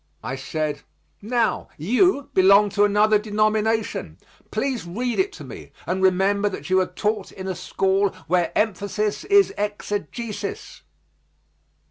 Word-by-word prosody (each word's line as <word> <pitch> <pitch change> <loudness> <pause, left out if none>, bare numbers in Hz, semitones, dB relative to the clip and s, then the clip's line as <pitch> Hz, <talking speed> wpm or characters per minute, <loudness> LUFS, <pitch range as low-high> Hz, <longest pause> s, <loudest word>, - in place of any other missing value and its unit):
I 130 - -3
said, 145 +2 -3 0.4
"Now, 230 +1 0
you 265 - +2
belong 200 +2 +6
to 205 +1 +3
another 210 +1 +4
denomination. 215 +1 0 0.3
Please 265 -5 -2
read 235 - -3
it 390 +1 +2
to - - -10
me, - - -10
and 190 +1 -2
remember 195 +2 +2
that 190 - -7
you 185 - +5
are 185 - +1
taught 205 +2 -2
in 190 0 -8
a 190 - -1
school 195 +2 +1 0.2
where 175 +1 +1
emphasis 210 0 -1
is 400 -1 +4
exegesis." 210 - -4
205 Hz, 130 wpm, -23 LUFS, 190-220 Hz, 0.4 s, belong